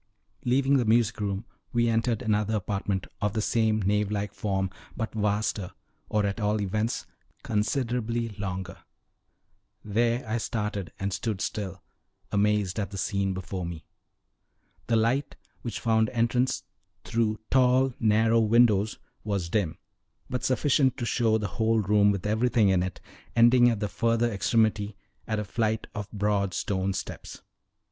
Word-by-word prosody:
Leaving 135 +3 +3
the 125 - +2
music 115 0 +3
room, 100 +1 -2 0.3
we 120 0 +3
entered 115 0 +1
another 105 0 +1
apartment, 100 -1 -2 0.2
of 105 -1 0
the 110 - -1
same 110 0 +2
nave 105 +1 +1
like 105 -1 -2
form, 95 -2 -1 0.3
but 110 - -3
vaster, 105 -3 -1 0.4
or, 105 -1 +1
at 100 +2 -2
all 105 0 +1
events, 105 +3 -1 0.4
considerably 115 +1 -1
longer. 95 -3 -5 1.1
There 115 +3 +1
I 110 +2 -1
started 105 -5 -3
and 95 0 -2
stood 105 +1 -2
still, 95 -3 -4 0.5
amazed 105 -1 +1
at 100 - -2
the 100 - -7
scene 95 -1 -1
before 95 0 -4
me. 85 -2 -6 1.0
The 115 - +2
light, 120 +5 +1 0.3
which 120 - -4
found 110 -1 +2
entrance 120 +2 +1 0.4
through 110 -2 0
tall, 130 0 +4
narrow 110 +1 +4
windows, 110 -2 +4 0.3
was 100 -5 -2
dim, 85 -5 0 0.5
but 125 - -2
sufficient 130 0 +2
to 120 - -2
show 115 -2 +2
the 105 -2 -2
whole 115 0 +3
room 105 0 +4
with 100 -1 -1
everything 110 0 +3
in 95 -2 +3
it, 90 0 -4 0.4
ending 120 +1 +6
at 115 -3 -1
the 105 - -1
further 115 +3 +1
extremity 105 -1 +1 0.3
at 110 - -1
a 105 - -2
flight 110 +2 -1
of 105 -1 -6
broad 100 -3 0
stone 95 -1 -1
steps. 95 +1 -6
105 Hz, 145 wpm, -27 LUFS, 100-115 Hz, 1.1 s, ending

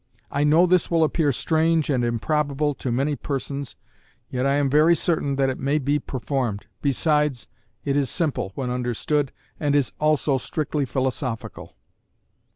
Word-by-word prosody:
I 140 - +1
know 155 +4 +5
this 180 -1 +2
will 165 -1 +3
appear 155 -1 +2
strange 160 +3 +1
and 125 -3 +1
improbable 145 +5 0
to 130 -2 -4
many 140 +5 0
persons, 140 -2 -4 0.6
yet 130 +1 0
I 140 - +2
am 145 -1 +2
very 155 +5 +5
certain 145 -6 0
it 135 -1 +1
may 140 +3 +1
be 145 +1 +1
performed, 125 -6 -3 0.2
besides, 150 -2 +1 0.4
it 140 -1 0
is 140 -3 +1
simple 130 - -1
(when 125 -2 -3
understood) 125 +3 -1 0.3
and 145 -1 +1
is 140 -3 +1
also 150 -3 +2
strictly 150 0 -2
philosophical. 130 -3 -3
140 Hz, 150 wpm, -24 LUFS, 130-150 Hz, 0.6 s, know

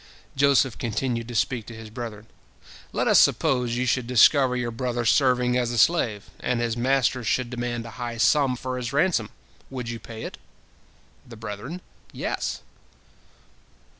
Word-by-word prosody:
Joseph 135 -3 +3
continued 115 0 -2
to 120 - -7
speak 115 +1 0
to 115 - -8
his 110 -1 -10
brethren: 110 -3 -7 0.7
"Let - - 0
us - - +6
suppose 125 -3 +2
you 125 - 0
should 125 0 0
discover 125 +1 +5
your 125 -1 -2
brother 120 0 -2
serving 125 0 +3
as 125 -1 +1
a 120 - -3
slave, 110 - +2
and 125 -1 -1
his 115 -1 -1
master 125 0 +1
should 120 +2 0
demand 120 -1 -3
a 115 - -8
high 120 -1 -4
sum 130 +3 +3
for 130 +1 -4
his 125 -1 -4
ransom, 145 - +2 0.4
would 125 -3 -5
you 115 0 -5
pay 115 -1 -9
it?" - - -7 0.9
The 115 -2 -11
brethren: 110 - -6 0.3
"Yes!" - - -3
120 Hz, 160 wpm, -25 LUFS, 115-130 Hz, 0.9 s, us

